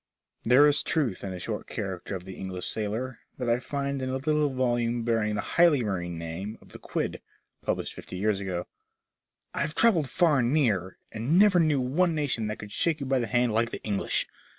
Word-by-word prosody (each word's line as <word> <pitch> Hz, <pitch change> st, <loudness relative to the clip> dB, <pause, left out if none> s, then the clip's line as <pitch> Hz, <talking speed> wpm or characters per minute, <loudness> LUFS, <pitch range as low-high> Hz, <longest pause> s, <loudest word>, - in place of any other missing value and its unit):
There 125 Hz, +5 st, +6 dB
is 145 Hz, -, +3 dB
truth 135 Hz, -, -1 dB
in 100 Hz, -, -4 dB
a 90 Hz, -, -6 dB
short -, -, -4 dB
character 95 Hz, -1 st, -4 dB
of 90 Hz, -1 st, -7 dB
the 95 Hz, -, -7 dB
English 95 Hz, -1 st, -5 dB
sailor, 110 Hz, +4 st, -3 dB, 0.2 s
that 125 Hz, -, -3 dB
I 120 Hz, +1 st, +3 dB
find 140 Hz, 0 st, -3 dB
in 130 Hz, -, -2 dB
a 130 Hz, -, -1 dB
little 150 Hz, +2 st, +1 dB
volame 120 Hz, -3 st, 0 dB
bearing 110 Hz, -2 st, +1 dB
the 100 Hz, -, -1 dB
highly 165 Hz, -4 st, +4 dB
marine 90 Hz, -5 st, -3 dB
name 85 Hz, +6 st, -5 dB
of -, -, -19 dB
"The -, -, -11 dB
Quid," -, -, -3 dB, 0.4 s
published -, -, -2 dB
fifty 90 Hz, -, -8 dB
years 105 Hz, +1 st, +1 dB
ago: 90 Hz, -3 st, -3 dB, 0.9 s
*'I -, -, -3 dB
have 150 Hz, +2 st, -2 dB
travelled 175 Hz, -, +4 dB
far 155 Hz, +1 st, +3 dB
and 120 Hz, 0 st, +2 dB
near, 105 Hz, -, +1 dB
and 120 Hz, +10 st, 0 dB
never 200 Hz, -2 st, +6 dB
knew 155 Hz, -4 st, +3 dB
one 160 Hz, +7 st, +1 dB
nation 130 Hz, -7 st, 0 dB
that 105 Hz, -, -3 dB
could 105 Hz, -1 st, -9 dB
shake 165 Hz, +5 st, +1 dB
you 140 Hz, -, -4 dB
by 135 Hz, 0 st, +2 dB
the 120 Hz, -, -1 dB
hand 120 Hz, -1 st, +2 dB
like 115 Hz, +1 st, +2 dB
the -, -, -7 dB
English. 100 Hz, -2 st, 0 dB
120 Hz, 210 wpm, -27 LUFS, 100-140 Hz, 0.9 s, There